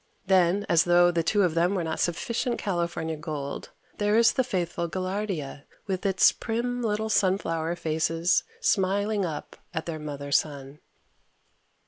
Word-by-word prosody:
Then, 190 +1 +3
as 165 -1 +4
though 175 0 +5
the 170 -1 +1
two 205 +5 +2
of 175 -3 +1
them 175 +4 +2
were 180 - -1
not 160 -1 -3
sufficient 235 +8 -1
California 170 -4 -2
gold, 150 -2 -5 0.3
there 210 +1 +2
is 230 0 +5
the 260 - +2
faithful 175 -6 -2
gaillardia 185 -6 -4 0.2
with 190 -1 -2
its 190 -1 +5
prim 245 +2 -3
little 220 -1 -1
sunflower 175 -5 +1
faces 165 +2 +1 0.2
smiling 200 - +1
up 155 -3 -6 0.2
at 160 - -2
their 160 -2 -4
Mother 145 -2 -6
Sun. 140 -1 -1
175 Hz, 145 wpm, -26 LUFS, 160-205 Hz, 0.3 s, though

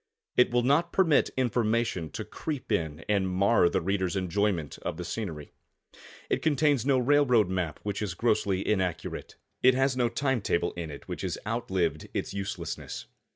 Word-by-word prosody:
It 125 - +5
will 120 0 +2
not 155 +7 +3
permit 165 -6 +3
information 115 -8 0
to - - -4
creep 145 -7 -5
in 80 -5 -1
and 100 -3 +1
mar 95 0 +4
the - - 0
reader's 95 0 0
enjoyment 95 -4 -1
of - - -4
the - - -5
scenery. 80 -10 -5 0.8
It - - 0
contains 145 -4 +2
no 135 -2 +4
railroad 125 -6 +4
map 90 -5 -2
which 105 0 -3
is 100 -5 -3
grossly 100 -4 +1
inaccurate. 90 -5 -2 0.3
It 130 0 +6
has 135 0 +2
no 120 -2 +2
time 135 0 0
table 85 -3 0
in 85 -2 -5
it 70 - -10
which - - -5
has - - -2
outlived 95 -6 -1
its - - -2
uselessness. 100 -4 -5
105 Hz, 165 wpm, -28 LUFS, 90-125 Hz, 0.8 s, It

